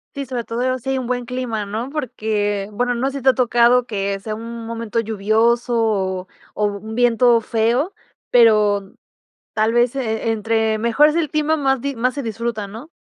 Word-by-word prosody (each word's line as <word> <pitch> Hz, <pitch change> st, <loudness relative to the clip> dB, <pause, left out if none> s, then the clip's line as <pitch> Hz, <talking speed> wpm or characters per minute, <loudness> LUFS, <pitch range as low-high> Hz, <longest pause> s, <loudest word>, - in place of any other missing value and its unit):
Sí, 280 Hz, -1 st, -4 dB
sobre 250 Hz, -2 st, -4 dB
todo 250 Hz, +3 st, -1 dB
si 260 Hz, +3 st, -6 dB
hay 270 Hz, -, +1 dB
un 255 Hz, -, -3 dB
buen 245 Hz, 0 st, -2 dB
clima, 240 Hz, -4 st, -3 dB
¿no?, 220 Hz, +5 st, -4 dB
porque, 215 Hz, -7 st, -2 dB
bueno, 245 Hz, +3 st, -1 dB
no 265 Hz, +3 st, -1 dB
sé 280 Hz, -, -5 dB
si 260 Hz, -, -12 dB
te 270 Hz, -, +6 dB
ha 260 Hz, -, +5 dB
tocado 240 Hz, 0 st, +4 dB
que 200 Hz, -3 st, -2 dB
sea 215 Hz, +2 st, -5 dB
un 230 Hz, +1 st, -7 dB
momento 230 Hz, 0 st, -3 dB
lluvioso, 225 Hz, +3 st, +1 dB
o 190 Hz, -5 st, 0 dB, 0.3 s
o 210 Hz, -, +1 dB
un 210 Hz, +2 st, -4 dB
viento 240 Hz, 0 st, +4 dB
feo, 235 Hz, -, 0 dB, 0.4 s
pero 210 Hz, -4 st, +4 dB, 0.6 s
tal 220 Hz, +1 st, +1 dB
vez 240 Hz, +2 st, +2 dB
e 225 Hz, -3 st, -1 dB
entre 220 Hz, 0 st, 0 dB
mejor 235 Hz, +7 st, +4 dB
es 305 Hz, -, -2 dB
el 330 Hz, -3 st, 0 dB
clima, 305 Hz, +2 st, +1 dB
más 270 Hz, -4 st, +1 dB
di 280 Hz, 0 st, -3 dB
más 250 Hz, +3 st, 0 dB
se 280 Hz, -, -3 dB
disfruta, 225 Hz, -1 st, -3 dB
¿no? 225 Hz, +10 st, -10 dB
230 Hz, 195 wpm, -20 LUFS, 215-250 Hz, 0.6 s, te